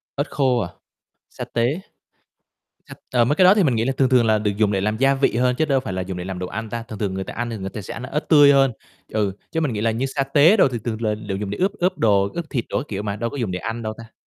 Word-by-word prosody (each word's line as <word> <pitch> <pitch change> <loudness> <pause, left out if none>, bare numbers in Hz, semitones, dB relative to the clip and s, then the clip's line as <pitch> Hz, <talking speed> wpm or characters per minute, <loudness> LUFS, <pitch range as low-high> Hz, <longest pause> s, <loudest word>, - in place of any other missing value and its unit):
Ớt 145 +1 -1
khô 130 -3 +2
à, 85 - -2 0.6
sa - - -6
tế. 120 +9 -1 1.3
À, 120 -2 +3
mấy 135 +5 +1
cái 185 - +5
đó 185 +2 +8
thì 205 - +3
mình 135 -7 +2
nghĩ 115 - +1
là 135 - 0
thường 135 - +4
thường 125 -3 +4
là 110 -1 +3
được 105 0 0
dùng 105 -1 +2
để 95 - 0
làm 105 +2 -1
gia 135 +3 +3
vị 135 -3 +1
hơn 125 +1 +2
chứ 155 - +3
đâu 135 -3 +1
phải 130 - -5
là 95 - -2
dùng 90 0 -5
để 90 - -5
làm 95 -1 -5
đồ 90 - -3
ăn 110 +4 -5
ta. 115 -1 -4
Thường 110 -3 -9
thường 100 -3 -2
người 95 0 -3
ta - - -8
ăn 120 0 -3
thì 115 - -4
người 95 -1 -5
ta 110 - -6
sẽ 100 - -8
ăn 115 - -7
ớt 150 +4 -4
tươi 145 -3 +7
hơn, 135 -2 +4 0.4
ừ, 105 -3 0 0.2
chứ 160 - -1
mình 150 -6 0
nghĩ 105 - -3
là 115 +1 +1
như 120 +5 -1
sa 135 +1 -1
tế 145 +8 +5
đồ 185 - +5
thì 120 -2 -4
thường 115 -1 -3
là 110 -1 +1
đều 105 -2 -5
dùng 100 -1 -4
để 105 - -5
ướp 190 +2 +1
ướp 185 -2 -1
đồ, 100 -3 +3
ướp 170 - -3
thịt 120 -6 -1
đồ - - -1
các 135 - -4
kiểu 100 -1 -4
mà, 100 -1 -3
đâu 115 +2 -3
có - - -7
dùng 115 -7 -2
để 90 - -3
ăn 115 +3 -5
đâu 110 -1 -3
ta. 115 -1 -12
115 Hz, 325 wpm, -22 LUFS, 105-135 Hz, 1.3 s, đó